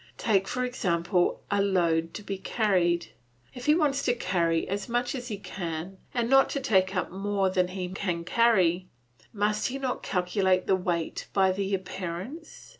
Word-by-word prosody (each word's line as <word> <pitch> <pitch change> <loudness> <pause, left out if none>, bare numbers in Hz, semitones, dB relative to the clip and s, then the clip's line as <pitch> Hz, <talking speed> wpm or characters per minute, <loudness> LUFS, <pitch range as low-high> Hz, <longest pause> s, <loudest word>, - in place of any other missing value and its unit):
Take, 195 -4 +2
for 250 0 -1
example, 180 -6 0
a 200 0 +3
load 170 -4 +1
to 210 - -6
be 195 -2 -4
carried; 180 -6 +1 0.4
if 250 +1 -8
he 300 - +6
wants 290 -4 +2
to 245 - +2
carry 170 -6 0
as 200 +2 -3
much 245 +1 0
as 250 -3 -5
he 215 -4 -4
can, 180 -1 -6
and 240 -2 0
not 270 +2 +5
to 280 - -2
take 195 -7 +2
up 180 - -1
more 195 0 0
than 185 -1 +2
he 185 0 -4
can 180 -3 -2
carry, 185 -4 +3 0.4
must 210 +1 0
he 265 - -3
not 260 -2 -2
calculate 185 0 +1
the 190 - +3
weight 175 -3 -2
by 190 -1 +4
the 195 +1 -1
appearance? 190 - -7
195 Hz, 175 wpm, -27 LUFS, 180-230 Hz, 0.4 s, he